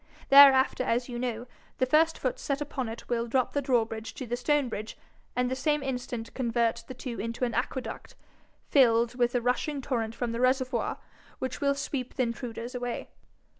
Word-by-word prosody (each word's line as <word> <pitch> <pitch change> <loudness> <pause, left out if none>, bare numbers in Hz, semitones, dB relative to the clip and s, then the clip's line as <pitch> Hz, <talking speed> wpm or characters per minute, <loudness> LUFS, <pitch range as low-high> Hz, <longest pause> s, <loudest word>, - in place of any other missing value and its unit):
Thereafter, 270 -2 +7
as 245 +1 0
you 240 -1 -4
know, 240 -1 -3 0.3
the 255 - +2
first 320 +5 +3
foot - - -2
set 280 0 -2
upon 275 -5 -3
it 225 - -8
will 235 -1 -1
drop 255 +1 +1
the 285 - +1
drawbridge 225 -4 -1
to 260 - -5
the 240 +1 -2
stone 285 +2 +1
bridge, 215 -2 -6 0.4
and 250 0 +1
the 260 - -1
same 295 +1 0
instant 245 -3 -4
convert 235 -2 0
the 255 - -8
two 240 -1 -6
into 230 +3 -2
an 235 - -3
aqueduct, 255 +1 -4 0.5
filled 235 -4 +4
with 245 0 +1
a 245 - +2
rushing 255 +4 0
torrent 230 -4 -2
from 245 -2 -2
the 230 +1 -3
reservoir, 255 +1 +1 0.4
which 260 -1 -4
will 280 -1 +2
sweep 275 -2 -4
the 255 - +2
intruders 235 0 -5
away. 245 -1 -4
250 Hz, 185 wpm, -28 LUFS, 235-265 Hz, 0.5 s, Thereafter